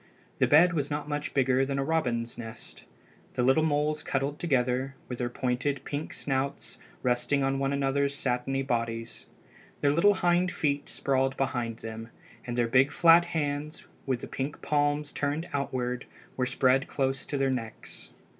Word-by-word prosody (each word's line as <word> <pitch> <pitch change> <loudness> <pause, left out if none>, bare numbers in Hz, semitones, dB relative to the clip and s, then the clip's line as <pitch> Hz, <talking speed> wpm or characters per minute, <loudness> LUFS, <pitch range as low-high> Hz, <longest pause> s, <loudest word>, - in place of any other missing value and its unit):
The - - +4
bed 170 +4 +6
was 145 -3 -1
not 145 0 -3
much 145 0 -3
bigger 130 -1 +3
than 135 0 -2
a 135 - +1
robin's 125 -7 -1
nest. 115 -1 -8 0.5
The 125 - 0
little 135 +5 +4
moles 150 0 +1
cuddled 140 +2 -2
together, 130 -3 0
with 125 - -6
their 120 -1 -1
pointed 130 +3 -1
pink 145 +2 -4
snouts 140 0 -3 0.2
resting 125 +3 +1
on 135 0 +1
one 135 0 0
another's 140 0 +1
satiny 135 +1 -1
bodies. 115 -2 -3 0.5
Their 145 - +4
little 195 +7 +4
hind 180 0 +2
feet 145 -2 -1
sprawled 135 -1 0
behind 120 -4 -1
them, 115 0 -6 0.4
and 120 0 -3
their 120 -1 +2
big 130 +4 +4
flat 170 +2 +6
hands, 150 -1 -3 0.2
with 130 -2 0
the - - -6
pink 135 +3 -4
palms 145 0 +1
turned 150 +4 -2
outward, 125 -3 -2 0.3
were 125 -1 0
spread 130 +1 +2
close 135 -1 -1
to 145 - -2
their 135 -1 +2
necks. 115 -4 -6
135 Hz, 165 wpm, -28 LUFS, 125-145 Hz, 0.5 s, bed